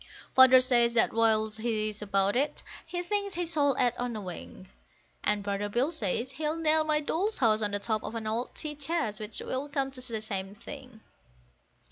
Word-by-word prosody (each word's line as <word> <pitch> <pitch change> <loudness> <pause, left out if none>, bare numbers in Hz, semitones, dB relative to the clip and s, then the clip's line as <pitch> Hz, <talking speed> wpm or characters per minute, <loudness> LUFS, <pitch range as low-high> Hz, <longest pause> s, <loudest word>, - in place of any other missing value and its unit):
Father 260 0 +8
says 240 -2 +3
that 225 - +3
whilst 220 -1 +2
he 215 -2 -1
is 210 0 -8
about 200 0 +1
it, 285 +3 0 0.2
he 350 +1 -3
thinks 400 +1 -2
he 350 0 -1
shall 290 -5 +2
add 245 -1 +3
on 245 -1 -2
a 215 - -4
wing; 185 0 -9 0.6
And 210 -1 +1
brother 200 0 -2
Bill 250 +9 +1
says 235 - -2
he'll 300 +3 -2
nail 315 -1 +3
my 305 -1 +2
Doll's 380 +8 -1
House 220 -3 +3
on 210 - +1
the 205 - -1
top 215 +1 -2
of 225 - -6
an 225 -1 -4
old 225 +3 -3
tea 305 -1 -4
chest, 290 -7 -2
which 215 0 -3
will 270 +3 -3
come 275 -1 -1
to 260 -1 -7
the 230 -3 -3
same 195 -2 -4
thing. 255 -1 -11
240 Hz, 200 wpm, -29 LUFS, 215-295 Hz, 0.6 s, Father